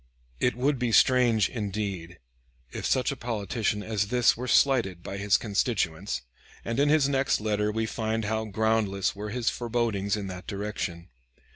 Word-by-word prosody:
It 125 Hz, -, +1 dB
would 135 Hz, +2 st, 0 dB
be 125 Hz, -2 st, 0 dB
strange, 120 Hz, -3 st, +4 dB
indeed, 100 Hz, -6 st, -4 dB, 0.5 s
if -, -, -3 dB
such 130 Hz, +2 st, +1 dB
a -, -, -4 dB
politician 110 Hz, -3 st, -2 dB
as 105 Hz, -2 st, -1 dB
this 125 Hz, +2 st, +3 dB
were 125 Hz, +2 st, -5 dB
slighted 115 Hz, -12 st, +3 dB
by 100 Hz, -, -5 dB
his 100 Hz, 0 st, +3 dB
constituents, 100 Hz, -, -1 dB, 0.4 s
and 115 Hz, +3 st, -2 dB
in 145 Hz, +1 st, +4 dB
his 150 Hz, -2 st, +4 dB
next 135 Hz, -1 st, +1 dB
letter 105 Hz, 0 st, 0 dB
we 110 Hz, +1 st, -1 dB
find 110 Hz, 0 st, -2 dB
how 110 Hz, +1 st, -1 dB
groundless 110 Hz, -2 st, 0 dB
were 105 Hz, +1 st, -5 dB
his 120 Hz, +1 st, 0 dB
forebodings 115 Hz, -4 st, -1 dB
in 100 Hz, -, -4 dB
that 90 Hz, -1 st, -8 dB
direction. 100 Hz, -4 st, -4 dB
110 Hz, 160 wpm, -27 LUFS, 100-120 Hz, 0.5 s, strange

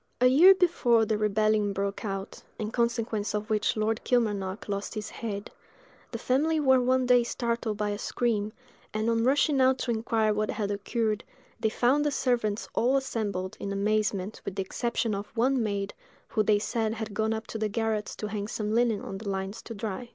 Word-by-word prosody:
A 250 Hz, -, +4 dB
year 325 Hz, +10 st, +8 dB
before 250 Hz, -, +3 dB
the 215 Hz, -, 0 dB
rebellion 215 Hz, -1 st, +2 dB
broke 200 Hz, +1 st, -3 dB
out, 195 Hz, -2 st, -5 dB, 0.2 s
in 215 Hz, 0 st, -3 dB
consequence 230 Hz, -3 st, -1 dB
of 210 Hz, +1 st, -3 dB
which 215 Hz, +1 st, +1 dB
Lord 215 Hz, +1 st, 0 dB
Kilmarnock 205 Hz, -5 st, 0 dB
lost 200 Hz, +2 st, -3 dB
his 215 Hz, 0 st, -5 dB
head, 205 Hz, -3 st, -5 dB, 0.6 s
the -, -, -3 dB
family 310 Hz, +5 st, +1 dB
were 265 Hz, -3 st, +4 dB
one 255 Hz, +1 st, +2 dB
day 245 Hz, -1 st, +5 dB
startled 235 Hz, -2 st, -2 dB
by 210 Hz, 0 st, -1 dB
a 205 Hz, -, -4 dB
scream, 215 Hz, -4 st, -1 dB, 0.4 s
and 215 Hz, +1 st, 0 dB
on 230 Hz, 0 st, +1 dB
rushing 275 Hz, +2 st, +3 dB
out 260 Hz, 0 st, +4 dB
to 250 Hz, -, -2 dB
inquire 220 Hz, -1 st, +1 dB
what 210 Hz, 0 st, -1 dB
had 205 Hz, -2 st, -2 dB
occurred, 215 Hz, +1 st, -1 dB, 0.4 s
they 220 Hz, -, +1 dB
found 255 Hz, +6 st, +2 dB
the 295 Hz, -, +2 dB
servants 235 Hz, -6 st, 0 dB
all 255 Hz, +4 st, +3 dB
assembled, 205 Hz, -8 st, -3 dB
in 200 Hz, -, -4 dB
amazement, 205 Hz, 0 st, 0 dB
with 190 Hz, -, -5 dB
the 195 Hz, -, -1 dB
exception 230 Hz, +2 st, -1 dB
of 200 Hz, +1 st, -4 dB
one 255 Hz, +2 st, +3 dB
maid, 200 Hz, -2 st, -2 dB, 0.4 s
who 215 Hz, -, +1 dB
they 210 Hz, 0 st, +3 dB
said 220 Hz, +1 st, -1 dB
had 220 Hz, -2 st, -5 dB
gone 220 Hz, +1 st, 0 dB
up 220 Hz, 0 st, -3 dB
to 220 Hz, -, -6 dB
the 215 Hz, 0 st, 0 dB
garrets 220 Hz, -1 st, -1 dB
to -, -, -5 dB
hang 205 Hz, -1 st, -3 dB
some 215 Hz, 0 st, -3 dB
linen 230 Hz, -2 st, +2 dB
on 195 Hz, -, -6 dB
the 210 Hz, -1 st, -5 dB
lines 195 Hz, +1 st, -3 dB
to 230 Hz, -, -8 dB
dry. 215 Hz, +3 st, -5 dB
220 Hz, 195 wpm, -28 LUFS, 205-240 Hz, 0.6 s, year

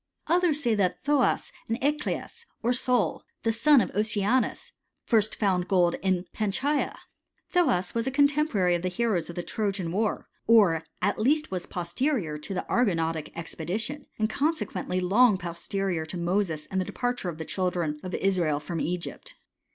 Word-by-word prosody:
Others 330 Hz, -3 st, +2 dB
say 235 Hz, -3 st, +2 dB
thai 190 Hz, -3 st, +1 dB
Thoas 285 Hz, -2 st, +2 dB, 0.2 s
and 230 Hz, +2 st, -1 dB
Eaclis, 300 Hz, -, -2 dB, 0.2 s
or 240 Hz, +2 st, +3 dB
Sol, 245 Hz, -7 st, +1 dB, 0.2 s
the 225 Hz, -, +2 dB
son 245 Hz, +4 st, +5 dB
of -, -, -2 dB
Oceanus, 210 Hz, +3 st, 0 dB, 0.3 s
first 220 Hz, -3 st, +2 dB
found 185 Hz, -4 st, +1 dB
gold 180 Hz, -3 st, +3 dB
in 185 Hz, -2 st, +1 dB
Panchaia. 265 Hz, +8 st, 0 dB, 0.5 s
Thoas 255 Hz, -, +2 dB
was 230 Hz, +2 st, -1 dB
a -, -, +3 dB
contemporary 285 Hz, -, +3 dB
of 175 Hz, -, 0 dB
the 185 Hz, -, -1 dB
heroes 185 Hz, -3 st, 0 dB
of 170 Hz, -, -7 dB
the 175 Hz, -, -3 dB
Trojan 195 Hz, -5 st, -2 dB
war, 210 Hz, +3 st, -1 dB, 0.2 s
or 200 Hz, -8 st, +5 dB, 0.2 s
at 205 Hz, +2 st, +1 dB
least 300 Hz, +7 st, +2 dB
was 180 Hz, -2 st, -3 dB
posterior 175 Hz, -, -1 dB
to 195 Hz, -, -6 dB
the -, -, -2 dB
Argonautic 165 Hz, -9 st, 0 dB
expedition, 210 Hz, -, -4 dB
and 215 Hz, -, +1 dB
consequently 225 Hz, -, -1 dB
loxjj 205 Hz, +4 st, +4 dB
posterior 175 Hz, 0 st, -3 dB
to 180 Hz, -, -5 dB
Moses 175 Hz, -3 st, 0 dB
and 190 Hz, 0 st, +1 dB
the -, -, -2 dB
departure 245 Hz, -5 st, -2 dB
of 160 Hz, -, -6 dB
the 160 Hz, -, -5 dB
childrea 175 Hz, -5 st, -2 dB
of 185 Hz, -1 st, -4 dB
Israel 175 Hz, -6 st, +1 dB
from 160 Hz, +2 st, -4 dB
Egypt. 180 Hz, -, -4 dB
200 Hz, 160 wpm, -27 LUFS, 175-245 Hz, 0.5 s, son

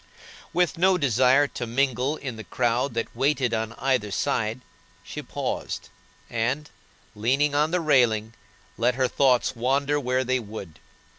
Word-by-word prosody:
With 175 Hz, -2 st, +1 dB
no 185 Hz, +1 st, +4 dB
desire 130 Hz, -, +4 dB
to 120 Hz, -, -5 dB
mingle 130 Hz, +3 st, 0 dB
in 130 Hz, -4 st, -5 dB
the 110 Hz, -, -8 dB
crowd 120 Hz, +5 st, 0 dB
that 115 Hz, -, -3 dB
waited 135 Hz, -1 st, +1 dB
on 110 Hz, 0 st, -2 dB
either 125 Hz, -4 st, 0 dB
side, 110 Hz, +4 st, -1 dB, 0.4 s
she -, -, -7 dB
paused, -, -, -4 dB, 0.4 s
and, 125 Hz, +6 st, -1 dB, 0.5 s
leaning 135 Hz, +7 st, +1 dB
on 150 Hz, +2 st, +2 dB
the 180 Hz, +1 st, 0 dB
railing, 115 Hz, -8 st, +2 dB, 0.5 s
let 120 Hz, +2 st, +2 dB
her 130 Hz, 0 st, +2 dB
thoughts 130 Hz, -1 st, +2 dB
wander 140 Hz, +4 st, +1 dB
where 130 Hz, -1 st, 0 dB
they 130 Hz, 0 st, +1 dB
would. 105 Hz, -8 st, -9 dB
130 Hz, 145 wpm, -25 LUFS, 115-140 Hz, 0.5 s, no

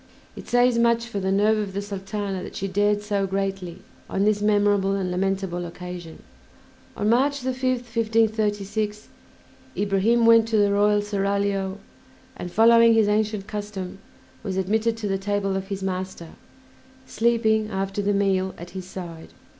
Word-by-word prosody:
It -, -, -10 dB
says 245 Hz, -1 st, +3 dB
much 235 Hz, 0 st, +3 dB
for 235 Hz, -4 st, -4 dB
the 190 Hz, 0 st, -1 dB
nerve 210 Hz, +2 st, +3 dB
of 200 Hz, -2 st, -4 dB
the 200 Hz, -, -2 dB
Sultana 195 Hz, -1 st, -4 dB
that -, -, -8 dB
she 195 Hz, -, -3 dB
dared 205 Hz, +2 st, +1 dB
so 200 Hz, -2 st, -1 dB
greatly 190 Hz, -2 st, -3 dB, 0.3 s
on 195 Hz, -, 0 dB
this 210 Hz, 0 st, +2 dB
memorable 205 Hz, -2 st, +2 dB
and 185 Hz, -2 st, -2 dB
lamentable 190 Hz, -1 st, -1 dB
occasion. 175 Hz, -1 st, -8 dB, 0.7 s
On 210 Hz, -, -1 dB
March 275 Hz, +5 st, +2 dB
5th, 255 Hz, -1 st, -1 dB
1536, 215 Hz, -2 st, 0 dB, 0.7 s
Ibrahim 205 Hz, +4 st, +2 dB
went 230 Hz, -1 st, +6 dB
to 225 Hz, -1 st, +1 dB
the 205 Hz, -1 st, +3 dB
royal 205 Hz, 0 st, +3 dB
seraglio, 200 Hz, -1 st, -1 dB, 0.6 s
and, 180 Hz, -8 st, -7 dB
following 230 Hz, +2 st, +6 dB
his 220 Hz, -2 st, +4 dB
ancient 210 Hz, -1 st, 0 dB
custom, 205 Hz, -3 st, -6 dB, 0.4 s
was 190 Hz, -2 st, -4 dB
admitted 220 Hz, +4 st, 0 dB
to 220 Hz, -2 st, -3 dB
the 195 Hz, -1 st, -1 dB
table 200 Hz, 0 st, -1 dB
of 190 Hz, 0 st, -3 dB
his 195 Hz, -1 st, -5 dB
master, 185 Hz, -3 st, -4 dB, 0.8 s
sleeping 220 Hz, -2 st, +1 dB
after 195 Hz, 0 st, -2 dB
the 200 Hz, 0 st, +1 dB
meal 195 Hz, -2 st, +1 dB
at 175 Hz, +1 st, -10 dB
his 185 Hz, -1 st, -7 dB
side. 170 Hz, -4 st, -9 dB
205 Hz, 155 wpm, -24 LUFS, 195-220 Hz, 0.8 s, went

